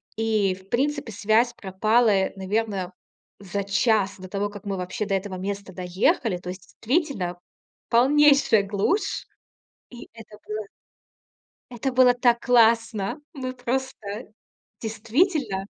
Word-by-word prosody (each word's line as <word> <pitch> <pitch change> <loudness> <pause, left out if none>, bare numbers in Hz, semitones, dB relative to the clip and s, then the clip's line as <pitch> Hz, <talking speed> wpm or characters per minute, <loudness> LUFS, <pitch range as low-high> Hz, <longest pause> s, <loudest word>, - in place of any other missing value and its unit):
И, 215 -4 +1
в 190 +1 -19
принципе, 280 0 -1
связь 220 +4 +2
пропала, 205 +1 +2
наверное, 195 -2 -2 0.5
за 200 0 -4
час 200 -1 +1
до 185 -1 -10
того, 200 +1 -1
как 205 -1 -11
мы 200 -1 -2
вообще 185 +3 -3
до 200 - -2
этого 195 0 -2
места 195 +1 -5
доехали. 185 - 0
То 180 - -12
есть, 185 +1 -7 0.2
действительно, 235 - -1 0.5
полнейшая 275 -2 +5
глушь. 205 - -1 0.6
И 240 -1 -11
это 215 -2 -13
было 215 0 -4 1.1
Это 250 +2 -2
было 250 -1 +5
так 240 -1 +2
классно! 230 0 +3
Мы 255 -3 -5
просто 260 +1 -3 0.8
Действительно! 225 - 0
215 Hz, 120 wpm, -24 LUFS, 195-245 Hz, 1.1 s, полнейшая